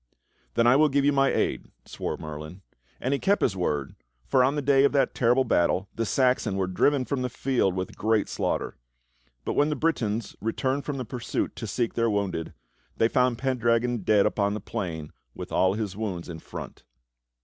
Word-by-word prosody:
"Then 115 Hz, -, +3 dB
I 125 Hz, +2 st, +6 dB
will 155 Hz, +1 st, +5 dB
give 140 Hz, 0 st, +2 dB
you 145 Hz, -, +4 dB
my 135 Hz, 0 st, +3 dB
aid," -, -, -1 dB, 0.2 s
swore -, -, -4 dB
Merlin; 75 Hz, +4 st, -8 dB, 0.4 s
and 130 Hz, -, -1 dB
he 140 Hz, -, 0 dB
kept 200 Hz, +2 st, +2 dB
his 100 Hz, -, +1 dB
word, 75 Hz, -7 st, -2 dB, 0.3 s
for 130 Hz, -, +3 dB
on 135 Hz, +3 st, +2 dB
the 145 Hz, -, -1 dB
day 135 Hz, 0 st, +4 dB
of 140 Hz, -, +3 dB
that 140 Hz, -, +2 dB
terrible 125 Hz, +2 st, +3 dB
battle 95 Hz, -4 st, +1 dB
the 115 Hz, -1 st, -2 dB
Saxons 125 Hz, -6 st, +2 dB
were 95 Hz, -1 st, 0 dB
driven 130 Hz, +9 st, +2 dB
from 140 Hz, -1 st, -2 dB
the 125 Hz, -, -1 dB
field 120 Hz, -7 st, 0 dB
with 95 Hz, 0 st, -4 dB
great 110 Hz, 0 st, +1 dB
slaughter; -, -, -2 dB, 0.7 s
but -, -, -1 dB
when 145 Hz, +1 st, +3 dB
the 150 Hz, -, 0 dB
Britons 115 Hz, -10 st, -1 dB
returned 130 Hz, +5 st, -1 dB
from 145 Hz, -2 st, -3 dB
the 130 Hz, -, -4 dB
pursuit 120 Hz, +1 st, -3 dB
to 115 Hz, -, -5 dB
seek 115 Hz, +3 st, -1 dB
their 115 Hz, 0 st, +1 dB
wounded, 100 Hz, -6 st, -2 dB, 0.4 s
they 115 Hz, -, +4 dB
found 125 Hz, -1 st, +2 dB
Pendragon 120 Hz, -2 st, +1 dB
dead 100 Hz, +1 st, +3 dB
upon 100 Hz, 0 st, +1 dB
the -, -, -3 dB
plain 80 Hz, -6 st, -5 dB, 0.2 s
with -, -, -7 dB
all 95 Hz, +1 st, +2 dB
his 105 Hz, -3 st, -3 dB
wounds 100 Hz, -5 st, -4 dB
in 80 Hz, -1 st, -6 dB
front. -, -, -9 dB
115 Hz, 195 wpm, -26 LUFS, 95-135 Hz, 0.7 s, I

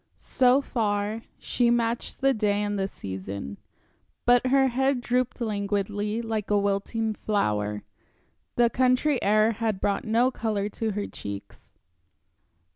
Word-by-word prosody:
So 255 Hz, +1 st, +3 dB
far, 210 Hz, -3 st, -1 dB, 0.2 s
she 240 Hz, -1 st, +1 dB
matched 235 Hz, 0 st, 0 dB
the 270 Hz, 0 st, +4 dB
day 210 Hz, -2 st, +1 dB
and 205 Hz, -1 st, -2 dB
the 195 Hz, -, 0 dB
season. 95 Hz, -, -7 dB, 0.7 s
But 245 Hz, +1 st, +4 dB
her 270 Hz, 0 st, +4 dB
head 265 Hz, +1 st, +1 dB
drooped 245 Hz, +1 st, -1 dB
languidly, 205 Hz, 0 st, -1 dB
like 220 Hz, -2 st, -3 dB
a 205 Hz, -, +3 dB
wilting 205 Hz, +3 st, 0 dB
flower, 105 Hz, -, -1 dB, 0.7 s
the 240 Hz, -1 st, +3 dB
country 255 Hz, +3 st, +2 dB
air 215 Hz, +2 st, +4 dB
had 220 Hz, -3 st, -2 dB
brought 200 Hz, 0 st, 0 dB
no 235 Hz, +4 st, +2 dB
color 210 Hz, -4 st, -2 dB
to 220 Hz, 0 st, -3 dB
her 205 Hz, 0 st, -2 dB
cheeks. 100 Hz, 0 st, -9 dB
215 Hz, 130 wpm, -26 LUFS, 200-240 Hz, 0.7 s, the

